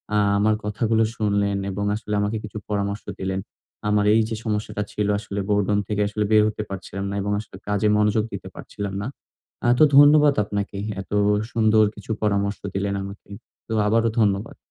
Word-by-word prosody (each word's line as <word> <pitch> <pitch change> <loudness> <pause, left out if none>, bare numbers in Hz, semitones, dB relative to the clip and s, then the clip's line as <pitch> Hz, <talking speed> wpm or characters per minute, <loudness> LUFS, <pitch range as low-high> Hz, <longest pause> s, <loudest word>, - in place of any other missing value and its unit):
আ - - +4 0.2
আমার 105 +1 +3
কথাগুলো 110 +2 +1
শুনলেন 100 -2 0
এবং 100 +2 -3
আসলে 105 -1 -5
আমাকে 105 +2 -1
কিছু 105 0 -7
পরামর্শ 100 0 -2 0.2
দিলেন। 95 0 -2 0.5
আমার 105 0 +2
এইযে 110 0 +2
সমস্যাটা 105 -1 -2
ছিল 105 -1 -1
আসলে 100 -2 -5
বোরডম 105 0 +2
থেকে 105 -1 -1
আসলে 105 +1 -2
বের 105 -1 +6
হতে 105 0 -3
পারছিলাম 95 0 -6
না 100 - -3
এবং 105 +1 -2
আসলে 105 -3 -10
কাজে 105 +1 +1
মনোযোগ 105 +1 +2
দিতে - - -6
পারছিলাম 100 -1 -6
না। 105 - -3 0.6
আ - - +3
তো - - +8
ধন্যবাদ 145 0 +7
আপনাকে। 100 0 -4 0.2
এত 95 - -14 0.4
সুন্দর 110 -1 +4
কিছু - - -8
পরামর্শ 100 -1 +1 0.2
দিলেন 100 0 -1
আমাকে। 100 +1 -10 0.4
তো 110 - -4
আবারো 115 +2 +3
ধন্যবাদ। 100 0 +1
105 Hz, 170 wpm, -23 LUFS, 100-110 Hz, 0.6 s, তো